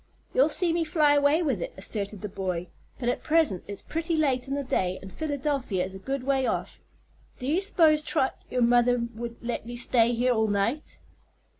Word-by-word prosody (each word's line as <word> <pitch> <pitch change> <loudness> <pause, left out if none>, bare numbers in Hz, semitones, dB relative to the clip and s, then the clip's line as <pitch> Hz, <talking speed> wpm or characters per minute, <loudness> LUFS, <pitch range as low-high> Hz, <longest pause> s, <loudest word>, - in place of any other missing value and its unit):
"You'll - - +4
see 350 -3 +3
me 335 0 +1
fly 310 -2 +3
away 290 +4 +3
with 260 - -1
it," - - -5
asserted 200 +1 -3
the 210 - -4
boy. 185 -3 -4 0.3
"But 240 - -4
at 245 - 0
present 310 - +2
it's 200 - -6
pretty 330 +1 -2
late 270 -4 +1
in 275 - -2
the 285 - -2
day, 185 -7 -1
and 190 -1 -11
Philadelphia 280 - -2
is 190 - -9
a 190 - -8
good 270 +5 -4
way 265 -1 +1
off. - - -3 0.6
Do 250 - -7
you 315 +8 +1
s'pose, 320 -6 +4
Trot, 295 -3 0
your 250 -1 +1
mother 245 +1 +4 0.2
would 235 +1 -6
let 235 -1 -4
me 240 - -6
stay 240 -1 +3
here 245 +2 +2
all 220 -1 +1
night?" 210 +8 -1
250 Hz, 200 wpm, -27 LUFS, 215-300 Hz, 0.6 s, You'll